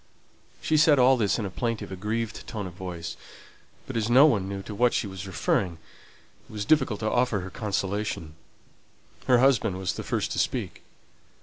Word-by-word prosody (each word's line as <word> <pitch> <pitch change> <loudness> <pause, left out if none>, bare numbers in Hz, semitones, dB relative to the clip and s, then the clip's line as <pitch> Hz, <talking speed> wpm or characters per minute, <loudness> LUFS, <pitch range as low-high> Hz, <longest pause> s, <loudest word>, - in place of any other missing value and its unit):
She 155 - +2
said 150 -1 +5
all 130 +1 +6
this 110 -5 +1
in 110 - -3
a 95 - -5
plaintive, 110 0 -3
aggrieved 110 +4 -4
tone 105 -3 -4
of 90 - -7
voice; 85 -3 -6 0.7
but - - -7
as 115 0 0
no 130 +5 +7
one 100 -10 +2
knew 100 -1 -5
to 105 - -7
what 120 +3 +2
she - - 0
was 95 -1 -7
referring, 95 0 0 0.8
it - - -13
was 105 -1 -4
difficult 135 -6 +2
to 110 - 0
offer 120 -5 +1
her 95 +1 -7
consolation. 100 -5 -3 0.9
Her 125 - +6
husband 120 -6 +3
was 95 -1 -2
the - - -6
first - - -2
to - - -2
speak. - - -2
105 Hz, 185 wpm, -26 LUFS, 95-120 Hz, 0.9 s, no